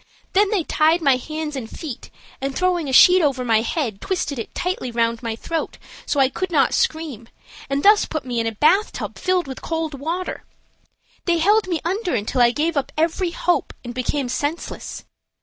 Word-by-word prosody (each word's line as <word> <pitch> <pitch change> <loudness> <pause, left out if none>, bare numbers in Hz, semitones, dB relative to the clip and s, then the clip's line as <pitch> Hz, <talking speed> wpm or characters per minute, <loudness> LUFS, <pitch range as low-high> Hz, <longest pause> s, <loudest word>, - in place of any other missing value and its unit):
Then 405 +1 +4
they 395 -5 +1
tied 315 +2 +3
my 275 -3 +4
hands 310 +2 -5
and 240 -5 -5
feet, 295 -8 -7 0.3
and, 270 0 -3
throwing 355 -5 +1
a - - -2
sheet 360 +8 +7
over 270 -5 +1
my 225 -2 +3
head, 230 - -2
twisted 335 -8 -2
it 225 - -7
tightly 360 -8 -2
around 230 -1 0
my 230 -2 -3
throat, 325 +7 -4 0.3
so 285 - 0
I 270 - +5
could 370 +8 -3
not 285 -6 +3
scream, 285 -8 -1 0.4
and 275 +1 -1
thus 415 +1 +6
put 310 -5 -4
me 245 -2 -2
in 230 - 0
a - - 0
bathtub 310 - +1
filled 365 -1 +1
with 265 -1 -8
cold 325 -2 -3
water. 330 +7 -4 0.8
They 345 -1 +2
held 410 +5 +3
me 340 -4 -1
under 375 +2 -1
until 225 +5 0
I 240 - +7
gave 310 +6 -1
up 280 - -1
every 335 +3 +1
hope 345 +1 0
and 240 -1 -6
became 255 +2 -1
senseless. 290 +6 -4
305 Hz, 190 wpm, -21 LUFS, 255-345 Hz, 0.8 s, sheet